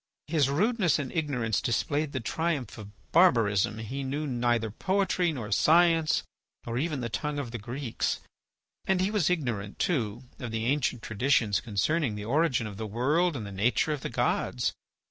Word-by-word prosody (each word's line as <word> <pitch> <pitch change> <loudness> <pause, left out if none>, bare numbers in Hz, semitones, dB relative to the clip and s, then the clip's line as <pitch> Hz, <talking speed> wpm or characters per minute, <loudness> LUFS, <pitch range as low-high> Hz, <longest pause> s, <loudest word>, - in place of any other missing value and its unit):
his 150 -4 +2
rudeness 190 - +2
and 140 -4 -4
ignorance 130 - 0
displayed 145 +5 0
the 130 - -2
triumph 145 0 -2
of 105 -2 -9 0.2
barbarism. 115 - +4
He 125 +6 -5
knew 140 +3 -2
neither 120 -4 0
poetry, 185 - +1
nor 115 -8 -5
science, 165 - +4 0.4
nor 115 +1 -2
even 150 -2 -1
the 120 - -2
tongue 150 +6 -3
of 135 -5 -4
the 120 - -5
Greeks, 120 +3 -2 0.7
and 190 -1 +2
he 190 +3 +1
was 205 -7 +2
ignorant, 120 - -2
too, 120 - -1 0.2
of 125 - -5
the 110 0 -2
ancient 130 -3 0
traditions 110 -2 +2
concerning 115 - 0
the 105 0 -6
origin 135 -1 +1
of 105 -2 -7
the 110 0 -4
world 145 - +1
and 115 -5 -4
the 100 - -7
nature 115 +10 +1
of 145 - -5
the - - -4
gods. - - 0
130 Hz, 170 wpm, -28 LUFS, 115-155 Hz, 0.7 s, barbarism